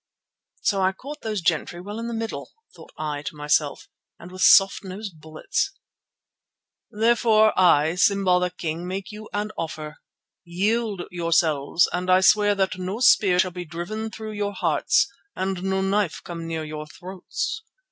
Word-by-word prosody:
"So 195 Hz, -2 st, +1 dB
I 190 Hz, 0 st, +2 dB
caught 285 Hz, +9 st, -9 dB
those 215 Hz, -3 st, -3 dB
gentry 170 Hz, +1 st, 0 dB
well 205 Hz, +5 st, -7 dB
in 230 Hz, -, -4 dB
the 235 Hz, -, -4 dB
middle," 225 Hz, 0 st, -5 dB, 0.2 s
thought -, -, -14 dB
I 150 Hz, -2 st, -3 dB
to 150 Hz, -, -6 dB
myself, 150 Hz, 0 st, 0 dB, 0.3 s
"and 175 Hz, -, -12 dB
with 185 Hz, 0 st, -8 dB
soft 195 Hz, +1 st, +6 dB
nosed 190 Hz, -3 st, -8 dB
bullets!" 160 Hz, -, -2 dB, 1.2 s
"Therefore 220 Hz, -1 st, +3 dB
I, 160 Hz, -3 st, +4 dB
Simba 190 Hz, -1 st, +3 dB
the 180 Hz, 0 st, 0 dB
King, 170 Hz, -1 st, -5 dB
make 190 Hz, +2 st, -5 dB
you 215 Hz, +1 st, -10 dB
an 210 Hz, +1 st, -2 dB
offer. 155 Hz, -2 st, -5 dB, 0.5 s
Yield 200 Hz, +3 st, -1 dB
yourselves 165 Hz, -2 st, +2 dB
and 180 Hz, +1 st, -2 dB
I 185 Hz, 0 st, +5 dB
swear 205 Hz, +2 st, +4 dB
that 190 Hz, -1 st, -1 dB
no 185 Hz, +4 st, -4 dB
spear 195 Hz, -7 st, +5 dB
shall 180 Hz, 0 st, +2 dB
be 180 Hz, 0 st, -6 dB
driven 175 Hz, +7 st, -5 dB
through 220 Hz, 0 st, -7 dB
your 205 Hz, -1 st, -3 dB
hearts -, -, +2 dB, 0.3 s
and 190 Hz, -1 st, -2 dB
no 190 Hz, 0 st, 0 dB
knife 195 Hz, -2 st, 0 dB
come 170 Hz, -2 st, -7 dB
near 160 Hz, -1 st, -3 dB
your 155 Hz, 0 st, -6 dB
throats. 195 Hz, -, -5 dB
185 Hz, 160 wpm, -24 LUFS, 170-210 Hz, 1.2 s, soft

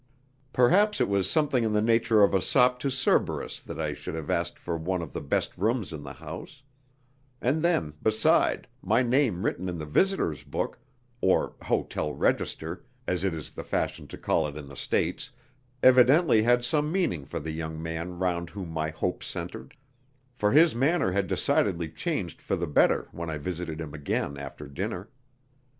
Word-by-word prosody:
Perhaps 195 Hz, -, +4 dB
it -, -, +3 dB
was 100 Hz, -2 st, +1 dB
something 145 Hz, -6 st, +2 dB
in 110 Hz, -1 st, 0 dB
the 105 Hz, -, +3 dB
nature 115 Hz, -1 st, +4 dB
of 100 Hz, -, +4 dB
a 95 Hz, -, +3 dB
sop 125 Hz, +5 st, +3 dB
to 140 Hz, -, -1 dB
Cerberus 130 Hz, 0 st, 0 dB
that -, -, -8 dB
I 75 Hz, -2 st, -1 dB
should 75 Hz, -, -6 dB
have 80 Hz, -3 st, -4 dB
asked 85 Hz, 0 st, -1 dB
for 85 Hz, -, -4 dB
one 90 Hz, +3 st, -1 dB
of 80 Hz, -6 st, -6 dB
the -, -, -4 dB
best 70 Hz, -, -1 dB
rooms 110 Hz, -2 st, 0 dB
in 75 Hz, -, -6 dB
the 70 Hz, 0 st, -8 dB
house; 80 Hz, -, -9 dB, 0.8 s
and 130 Hz, +6 st, +1 dB
then, 165 Hz, -, +1 dB
beside, 110 Hz, 0 st, +2 dB
my 115 Hz, +6 st, +2 dB
name 120 Hz, -7 st, +1 dB
written 90 Hz, +1 st, -1 dB
in 90 Hz, -, -4 dB
the 75 Hz, -, -5 dB
visitors' 75 Hz, -, +1 dB
book 70 Hz, -, -3 dB, 0.4 s
(or 95 Hz, -, +2 dB
"hotel 75 Hz, -1 st, -1 dB
register," -, -, -1 dB, 0.2 s
as 90 Hz, 0 st, -1 dB
it 95 Hz, -4 st, 0 dB
is 80 Hz, -, -6 dB
the -, -, -7 dB
fashion -, -, -2 dB
to -, -, -9 dB
call 80 Hz, -, +1 dB
it 75 Hz, 0 st, -7 dB
in 75 Hz, -2 st, -8 dB
the 70 Hz, -, -11 dB
States) 60 Hz, -, -1 dB, 0.5 s
evidently 130 Hz, 0 st, +6 dB
had 120 Hz, +2 st, +3 dB
some 150 Hz, +2 st, +1 dB
meaning 170 Hz, -, 0 dB
for -, -, -5 dB
the 80 Hz, +2 st, -5 dB
young 80 Hz, 0 st, -5 dB
man 80 Hz, +2 st, -4 dB
round 85 Hz, -2 st, -1 dB
whom 95 Hz, -3 st, -7 dB
my 80 Hz, -1 st, -2 dB
hopes 90 Hz, +3 st, -3 dB
centred, 65 Hz, -, -7 dB, 0.6 s
for 105 Hz, -4 st, +1 dB
his 160 Hz, +3 st, +6 dB
manner 135 Hz, -, +2 dB
had 100 Hz, +1 st, 0 dB
decidedly 85 Hz, -3 st, +1 dB
changed -, -, -3 dB
for -, -, -1 dB
the 85 Hz, -1 st, -2 dB
better 75 Hz, -, +3 dB
when 85 Hz, 0 st, -5 dB
I 80 Hz, -, -3 dB
visited 85 Hz, 0 st, -4 dB
him 80 Hz, -3 st, -6 dB
again 70 Hz, -1 st, -2 dB
after 70 Hz, +1 st, -8 dB
dinner. 90 Hz, +8 st, -5 dB
90 Hz, 185 wpm, -27 LUFS, 80-120 Hz, 0.8 s, evidently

